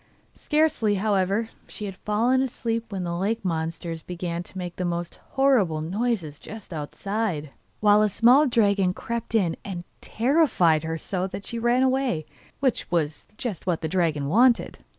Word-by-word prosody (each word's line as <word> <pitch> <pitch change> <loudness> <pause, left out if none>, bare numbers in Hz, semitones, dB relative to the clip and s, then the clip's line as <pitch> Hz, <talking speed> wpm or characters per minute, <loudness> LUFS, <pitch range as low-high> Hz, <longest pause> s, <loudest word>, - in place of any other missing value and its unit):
Scarcely, 300 -9 +1
however, 200 +1 +1
had 225 - -13 0.2
she 210 -3 -5
fallen 225 +7 +1
asleep 230 -3 -2
when 190 -2 -3
the 170 -1 -2
lake 200 +4 -1
monsters 165 -1 -3
began 175 -1 -4
to 180 - -11
make 180 -1 -5
the 185 - -2
most 175 -1 -3
horrible 245 - +3
noises 175 -3 -2
just 215 -4 -10
outside, 165 0 -3 0.3
while 210 0 +6
a 215 - +3
small 250 +9 +5
dragon 200 -6 +2
crept 230 -1 -4
in 180 -7 +2
and 180 -3 -5 0.2
terrified 230 - +3
her 160 0 -2
so 185 +3 -3
that 195 +1 -7
she 235 - -3
ran 240 +2 +3
away, 260 - +1 0.4
which 260 -4 0
was 155 -3 -1
just 205 -8 -4
what 175 -3 0
the 160 - -1
dragon 155 -5 0
wanted! 235 - +3
195 Hz, 160 wpm, -25 LUFS, 170-230 Hz, 0.4 s, while